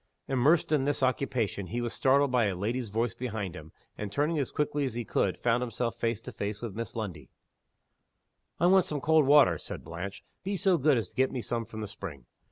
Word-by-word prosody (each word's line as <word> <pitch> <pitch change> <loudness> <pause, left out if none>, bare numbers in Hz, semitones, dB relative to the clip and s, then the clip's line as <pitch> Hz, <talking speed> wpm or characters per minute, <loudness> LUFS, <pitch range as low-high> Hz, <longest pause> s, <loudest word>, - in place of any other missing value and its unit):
Immersed 140 +5 +3
in 145 -3 +3
this 145 -1 0
occupation, 125 -7 0
he 120 +7 -3
was 120 -1 -2
startled 140 0 +3
by 125 -3 +3
a 100 -2 0
lady's 115 +5 -2
voice 115 +2 0
behind 110 -6 -4
him, 80 -1 -10 0.3
and, 105 -1 -4
turning 150 +6 +1
as 140 - -1
quickly 150 -1 -1
as 130 -4 -2
he 120 -1 -3
could, - - 0
found 120 0 +1
himself 115 -1 -2
face 115 -2 -1
to 125 - -8
face 100 -1 -4
with 115 -3 -5
Miss 115 0 -5
Lundie. 90 - -5 1.3
"I 170 - +3
want 185 0 +6
some 150 - -3
cold 155 0 +4
water," 140 - +6
said - - -7
Blanche. 95 +4 -6 0.2
"Be 200 +1 -2
so 190 -3 +3
good 140 -1 +4
as 105 -6 -2
to - - -22
get 130 +1 +2
me 125 -3 -4
some 115 -1 -2
from 110 -1 -7
the 105 - -4
spring." 75 -10 -8
120 Hz, 220 wpm, -29 LUFS, 105-140 Hz, 1.3 s, want